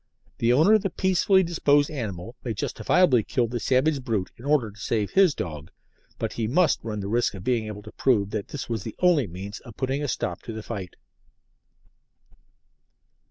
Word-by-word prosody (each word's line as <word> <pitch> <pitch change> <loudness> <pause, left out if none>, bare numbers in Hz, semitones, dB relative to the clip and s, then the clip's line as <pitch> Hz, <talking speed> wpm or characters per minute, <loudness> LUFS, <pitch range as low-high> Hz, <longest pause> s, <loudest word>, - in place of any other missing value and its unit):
The 115 - +3
owner 160 - +5
of 215 - +5
the 195 - -1
peaceably 190 +1 +3
disposed 145 -4 +2
animal 110 - -5
may 115 -3 -3
justifiably 125 - +2
kill 120 +2 0
the 120 +1 -3
savage 135 +3 +1
brute 110 -6 -2
in 120 - -13
order 140 -7 +2
to 105 - -17
save 105 0 -1
his 190 -6 +4
dog, 75 -3 -6 0.5
but - - -3
he 115 -2 -2
must 165 +8 +2
run 105 -2 -4
the 100 - -4
risk 115 0 +1
of 95 - -8
being 115 -2 0
able 105 -1 -7
to - - -11
prove 105 -7 +1
that 105 -2 -3
this 145 - -6
was 115 -3 -2
the 110 - -7
only 170 - +3
means 95 +4 -7
of 115 -5 -14
putting 135 +2 -1
a 145 - -1
stop 90 -8 -3
to 115 - -7
the 110 0 -6
fight. 95 -7 -6
120 Hz, 195 wpm, -25 LUFS, 105-145 Hz, 0.5 s, owner